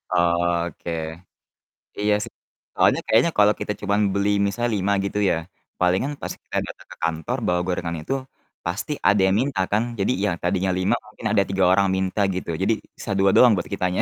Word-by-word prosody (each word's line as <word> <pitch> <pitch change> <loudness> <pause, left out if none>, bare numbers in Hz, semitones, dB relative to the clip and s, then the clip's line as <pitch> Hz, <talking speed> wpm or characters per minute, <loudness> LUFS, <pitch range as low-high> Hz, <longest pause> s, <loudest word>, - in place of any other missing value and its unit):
Oh, 85 0 +2
oke. 85 - -7 1.1
Iya, 105 0 +2
sih. - - -8 0.4
Soalnya - - +4
kayaknya 160 +10 +4
kalo 105 0 +6
kita 105 - -2
cuman 100 +1 +1
beli 100 +1 +1 0.2
misalnya 120 +4 -1
5 100 +1 +1
gitu 100 - -3
ya, - - +2 0.4
palingan 90 +10 +2
pas - - -4
kita - - -5
datang - - -11
ke - - -9
kantor 80 -1 -1
bawa 90 0 +2
gorengan 85 -2 -2
itu, 110 - -3 0.5
pasti 100 - -2
ada 100 0 +4
yang 95 - +2
minta 135 -7 -2
kan. 105 +2 +2 0.2
Jadi, 95 - +1
ya, - - +2
tadinya 95 +1 0
5 95 +6 +2
mungkin 110 +1 -13
ada 105 -2 +4
3 95 -1 +1
orang 100 +1 +4
minta, 95 +2 -1
gitu, 90 - -5
jadi 105 +4 +3 0.2
sisa - - -6
2 95 0 +5
doang 125 -2 +7
buat 85 - -4
kitanya. 90 0 0
95 Hz, 190 wpm, -23 LUFS, 90-105 Hz, 1.1 s, doang